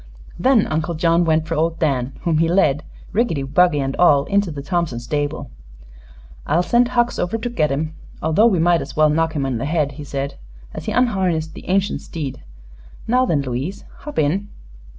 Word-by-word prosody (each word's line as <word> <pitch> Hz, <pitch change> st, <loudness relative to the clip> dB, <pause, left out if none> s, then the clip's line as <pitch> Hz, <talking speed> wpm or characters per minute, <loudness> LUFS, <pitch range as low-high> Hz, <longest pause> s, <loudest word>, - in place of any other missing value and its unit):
Then 240 Hz, +2 st, +4 dB
Uncle 160 Hz, +2 st, -2 dB
John 165 Hz, +2 st, +2 dB
went 160 Hz, -1 st, +1 dB
for 165 Hz, -, -2 dB
old 165 Hz, +1 st, 0 dB
Dan, 135 Hz, -5 st, 0 dB
whom 165 Hz, -3 st, +1 dB
he 165 Hz, -, +3 dB
led, 155 Hz, -6 st, +3 dB, 0.3 s
rickety 200 Hz, -, +1 dB
buggy 150 Hz, +3 st, +3 dB
and 135 Hz, 0 st, -2 dB
all, 145 Hz, -6 st, +5 dB
into 200 Hz, -1 st, +1 dB
the 145 Hz, -3 st, -6 dB
Thompson 160 Hz, -5 st, -1 dB
stable. 145 Hz, -, -3 dB, 1.0 s
"I'll 165 Hz, +4 st, +2 dB
send 240 Hz, +5 st, +3 dB
Hucks 240 Hz, -1 st, 0 dB
over 180 Hz, +6 st, -1 dB
to 225 Hz, +2 st, -4 dB
get 155 Hz, -, +1 dB
him, 155 Hz, +3 st, -2 dB, 0.3 s
although 160 Hz, +9 st, +3 dB
we 200 Hz, -6 st, +2 dB
might 170 Hz, 0 st, +3 dB
as -, -, -8 dB
well 155 Hz, -1 st, +4 dB
knock 160 Hz, +1 st, +1 dB
him 145 Hz, -4 st, -1 dB
in 130 Hz, -4 st, -2 dB
the 135 Hz, -, -2 dB
head," 150 Hz, -2 st, 0 dB
he 145 Hz, +2 st, -9 dB
said 140 Hz, 0 st, -4 dB, 0.3 s
as -, -, -7 dB
he -, -, -2 dB
unharnessed 185 Hz, -10 st, +1 dB
the -, -, -11 dB
ancient 195 Hz, +2 st, +1 dB
steed. 145 Hz, -6 st, -6 dB, 0.6 s
"Now 255 Hz, +2 st, +2 dB
then, 145 Hz, -8 st, +1 dB
Louise, 135 Hz, +9 st, -4 dB
hop 295 Hz, -, -9 dB
in." 180 Hz, +7 st, 0 dB
160 Hz, 190 wpm, -20 LUFS, 145-185 Hz, 1.0 s, all